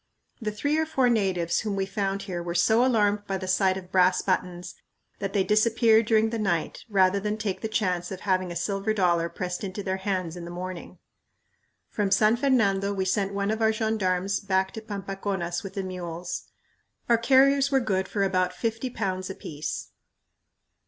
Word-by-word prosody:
The 215 - -1
three 285 +9 0
or 320 - 0
four 265 -5 +2
natives 185 -7 +1
whom 210 -2 -2
we 195 -1 0
found 195 0 -2
here 180 -3 -4
were 170 0 -4
so 220 +7 +4
alarmed 210 -5 +2
by 195 - -1
the 185 0 -6
sight 185 0 +2
of 185 -1 -10
brass 185 -1 +4
buttons 180 -2 -2 0.5
that 195 -1 -3
they 200 -2 +3
disappeared 220 +1 +3
during 220 0 +3
the 230 - -2
night 175 -6 -1
rather 195 -1 +3
than 210 +1 -2
take 200 -4 -3
the 220 - -2
chance 180 -5 -1
of 185 - -6
having 185 -2 0
a - - -6
silver 195 +4 -1
dollar 170 -4 +2
pressed 180 +2 -4
into 195 +1 -4
their 190 0 -1
hands 185 -3 -2
in 175 - -7
the 170 - -7
morning! 180 0 -7 0.9
From 205 -2 0
San 215 +3 +4
Fernando, 215 -7 +2
we 190 -1 -1
sent 195 +1 0
one 200 +1 0
of 220 +1 -2
our 220 0 +4
gendarmes 200 -4 0
back 190 -1 0
to 220 - -7
Pampaconas 195 -4 -3
with 195 - -9
the 195 - -2
mules. 180 -2 -5 0.6
Our 235 -1 +4
carriers 275 +3 +4
were 270 -1 +3
good 190 -6 -1
for 200 - -1
about 185 -1 +1
fifty 225 +5 -2
pounds 185 -5 -3
apiece. 155 -5 -5
195 Hz, 185 wpm, -26 LUFS, 185-220 Hz, 0.9 s, so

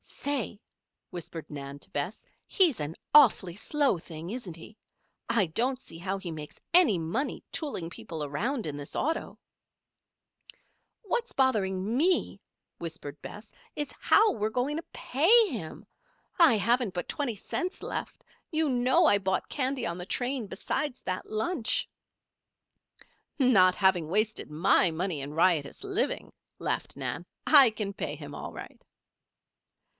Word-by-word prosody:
"Say!" 275 -7 -2 0.5
whispered 165 -2 -7
Nan 140 -1 -7
to - - -11
Bess. 145 +8 -3 0.2
"He's 340 - +3
an 150 +2 -4 0.2
awfully 215 - +6
slow 280 +1 +1
thing, 165 +1 -8
isn't 215 -9 -6
he? 190 +6 -13 0.5
I 230 -5 +3
don't 250 +10 0
see 165 - -12
how 190 +2 -2
he 190 -3 -5
makes 150 -2 -8
any 330 - +6
money 170 - -2
tooling 270 - -3
people 160 -2 -6
around 220 - -2
in 145 -2 -4
this 145 -1 -9
auto." 320 +3 -2 1.6
"What's 475 +3 -2
bothering 210 -4 +1
me," 355 +6 +2 0.4
whispered 160 -3 -7
Bess, 210 +1 -10 0.2
"is 295 -1 -3
how 435 0 +5
we're 215 -1 -1
going 260 +6 -1
to 330 - -4
pay 415 - +4
him? 210 - -6 0.5
I 320 -10 +7
haven't 230 0 +1
but 175 - -3
twenty 275 -6 -2
cents 360 - -4
left. - - -5 0.3
You 315 -2 +1
know 260 +7 +3
I 205 - +6
bought 190 -1 -1
candy 270 -1 -1
on 170 0 -3
the 180 - -5
train, 250 +1 -2
beside 250 +7 -2
that 185 0 -3
lunch." 225 +4 0 1.5
"Not 200 - +5
having 185 -5 +3
wasted 215 +5 -1
my 160 +3 +4
money 165 -2 -2
in 140 +2 -6
riotous 165 - +1
living," 400 +3 -1 0.3
laughed - - -2
Nan, - - -4 0.2
"I 280 -5 +9
can 210 -2 -3
pay 150 -6 -4
him 145 -1 -9
all - - -6
right." - - -10
210 Hz, 140 wpm, -29 LUFS, 170-275 Hz, 1.6 s, I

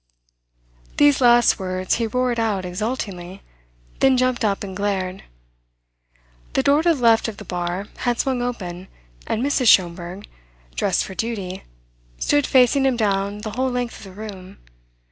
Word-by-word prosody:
These 290 -2 +4
last 240 -1 +5
words 185 -1 -2
he 230 -1 -1
roared 250 +1 0
out 205 -5 -1
exultingly, 190 -2 -5 0.6
then 265 -1 +4
jumped 255 -1 +1
up 200 -2 0
and 190 -2 -6
glared. 190 -2 -2 1.3
The - - +1
door 285 +2 +4
to 335 0 +3
the - - -8
left 230 -2 +4
of 220 -3 -6
the - - -10
bar 180 +2 -3
had 245 -1 -1
swung 260 -2 0
open, 190 -7 -5 0.4
and 225 - -1
Mrs. 275 -3 +1
Schomberg, 180 0 +2 0.5
dressed - - 0
for - - -8
duty, 195 -4 -4 0.5
stood 290 -1 +1
facing 260 +1 +4
him 255 -2 +1
down 200 -1 0
the 215 0 -5
whole 260 +4 -1
length 245 -1 -3
of - - -12
the 190 - -11
room. 195 -3 -9
215 Hz, 155 wpm, -22 LUFS, 190-245 Hz, 1.3 s, last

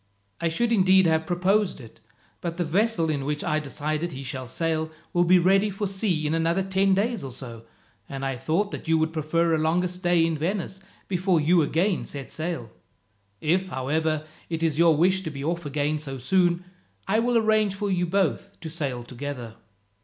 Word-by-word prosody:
I 170 - +1
should 235 +9 0
indeed 190 -3 +5
have 160 -1 +2
proposed 190 +2 +1
it, 115 -4 -14 0.4
but 170 -1 -4
the 180 - +1
vessel 185 +1 +1
in 140 -3 -2
which 150 +1 -2
I - - -1
have 155 0 0
decided 155 +4 -3
he 135 +1 -6
shall 130 0 -5
sail 160 +4 -1 0.2
will 175 -1 +3
be 180 +2 +6
ready 195 +4 +4
for 205 +1 -3
sea 190 -5 -1
in 150 - 0
another 165 +3 +1
ten 190 0 +2
days 220 -1 0
or 135 - -5
so, 120 -3 -9 0.4
and 135 0 -4
I 135 -1 -1
thought 170 - 0
that - - -7
you 160 0 +4
would 160 0 0
prefer 165 +2 +1
a 160 - +2
longer 165 +3 +2
stay 175 -2 +2
in 165 -2 -1
Venice 190 +3 -2 0.3
before 185 -2 +2
you 165 +3 +4
again 170 +5 +1
set 140 -2 -7
sail. 160 -8 -4 0.7
If, 180 +5 +1
however, 155 +2 -1 0.2
it 165 -1 -2
is 160 -2 +1
your 165 -2 +5
wish 185 +4 +3
to 170 - -4
be 140 -2 -6
off 170 0 -2
again 145 +2 -1
so 135 -3 -4
soon, 175 +5 +2 0.4
I 210 +3 +2
will 240 +1 +2
arrange 215 -3 +2
for 200 0 -2
you 180 -1 +1
both 195 +2 -1
to 160 - -6
sail 140 -7 -3
together. 125 -2 -6
165 Hz, 200 wpm, -25 LUFS, 150-190 Hz, 0.7 s, be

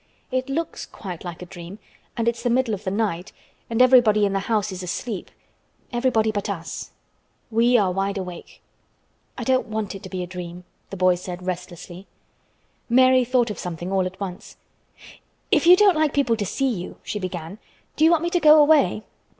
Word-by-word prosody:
"It 255 +1 -1
looks 325 +4 -3
quite 180 -5 -8
like 175 -1 -7
a - - -8
dream, 175 +1 -10 0.4
and 230 0 -1
it's 235 0 0
the 245 - 0
middle 240 -1 +1
of 200 0 -5
the - - 0
night, 195 -3 -2 0.4
and 230 +2 +4
everybody 235 -5 +5
in 200 - -1
the 195 - +1
house 210 0 -1
is 185 0 -6
asleep—everybody 220 +4 -3
but 205 -1 -3
us. 170 -4 -5 0.6
We 235 +2 +4
are 195 -5 +2
wide 195 +2 -1
awake." 180 -2 -8 0.7
"I - - -4
don't 260 -1 +1
want 215 -2 -3
it 195 - -9
to 190 - -9
be 185 -1 -4
a - - -4
dream," 180 0 -8 0.3
the 195 - -7
boy 185 0 +4
said 180 0 -7
restlessly. 180 0 -6 0.8
Mary 255 +1 +5
thought 245 -2 +1
of 210 - -7
something 175 +1 -5
all 190 -1 +1
at 185 - -10
once. 190 -2 -7 0.9
"If - - +3
you 355 - +10
don't 400 -3 +5
like 310 -2 +1
people 270 -5 +2
to 205 -3 -3
see 270 +6 0
you," 185 -7 -5
she 210 - -4
began, 185 0 -6 0.4
"do 310 - +1
you 320 - +7
want 335 -1 +3
me 345 - -1
to 355 - +2
go 310 -1 +7
away?" 290 - +4
205 Hz, 190 wpm, -23 LUFS, 180-250 Hz, 0.9 s, you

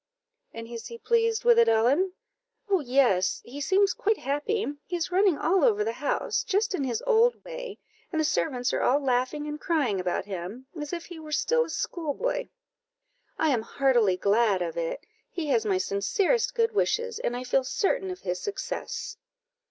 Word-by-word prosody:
"And 230 0 -8
is 230 -1 -7
he 465 - -8
pleased 460 -1 +1
with 475 -1 +6
it, 465 - +5
Ellen?" 275 +12 +3 0.5
"Oh, 390 -2 +3
yes! 245 - +2
he 275 +4 -8
seems 395 +5 +3
quite 440 -3 0
happy: 290 - -1 0.2
he 355 - -3
is 340 0 -2
running 375 -3 +3
all 365 +4 +2
over 425 -3 +3
the 445 - -1
house, - - -1
just 420 0 0
in 305 - -1
his 240 -4 -2
old 475 0 +3
way, - - -7 0.3
and 320 - -1
the 315 - +2
servants 255 -5 0
are - - 0
all 270 +3 +3
laughing 265 +2 0
and 300 0 -5
crying 275 - +1
about 180 -1 -1
him, 200 +6 -6
as 295 -2 -5
if 340 -1 -4
he 345 -2 -10
were 310 -1 -10
still 480 +10 +2
a - - -11
school 315 -5 -3
boy." - - -2 0.9
"I 320 -2 +2
am 240 -4 +1
heartily 235 -6 +2
glad 200 -2 +2
of 165 -2 -4
it 165 -1 -3 0.2
he 325 -4 -4
has 230 -5 +2
my 195 -2 +2
sincerest 350 - 0
good 460 -1 +2
wishes, 465 +1 0
and 245 - -2
I 250 - -5
feel 255 +1 +1
certain 385 - 0
of 365 0 -6
his 180 0 -3
success." 415 +2 -5
305 Hz, 190 wpm, -27 LUFS, -, 0.9 s, with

